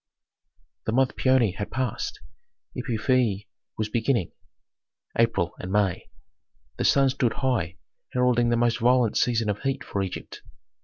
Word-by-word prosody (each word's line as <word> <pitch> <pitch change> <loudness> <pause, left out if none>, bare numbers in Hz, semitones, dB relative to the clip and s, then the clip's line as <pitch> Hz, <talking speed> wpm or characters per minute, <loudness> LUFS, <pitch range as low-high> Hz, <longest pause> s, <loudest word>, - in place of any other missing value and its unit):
The 110 - +1
month 130 +1 +2
Paoni 130 -7 +3
had 100 - -4
passed, 130 -4 -3 0.5
Epiphi 115 -3 0 0.3
was 110 - -1
beginning 115 -3 0 0.8
(April 100 -7 +1
and 90 - -6
May). 100 -3 0 0.7
The - - -1
sun 135 -1 +4
stood 125 -3 0
high, 120 -10 -1 0.3
heralding 125 -1 +2
the 120 - +2
most 120 0 +2
violent 120 -1 +3
season 115 -3 +2
of 105 -1 -1
heat 135 -1 -1
for 100 - -3
Egypt. 95 -2 -6
115 Hz, 135 wpm, -26 LUFS, 105-125 Hz, 0.8 s, sun